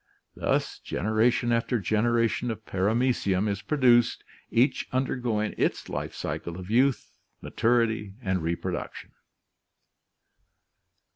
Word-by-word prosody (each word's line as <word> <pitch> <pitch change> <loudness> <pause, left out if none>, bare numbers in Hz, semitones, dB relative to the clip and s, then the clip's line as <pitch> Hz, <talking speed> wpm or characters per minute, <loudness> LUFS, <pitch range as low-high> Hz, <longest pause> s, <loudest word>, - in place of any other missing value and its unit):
Thus - - -1
generation 115 +4 +1
after 115 +1 +1
generation 115 +3 +1
of 110 -1 -5
Paramecium 105 -1 +1
is 100 -1 -2
pro 150 - -2
duced, 120 -3 +4 0.3
each 120 +5 +2
undergoing 120 -4 -1
its - - 0
life - - -4
cycle 85 0 -4
of 95 +2 -8
youth, 130 +3 +2 0.3
maturity, 110 -4 0
and 95 -6 -1
reproduction. 85 +1 -4
115 Hz, 100 wpm, -27 LUFS, 100-120 Hz, 0.3 s, duced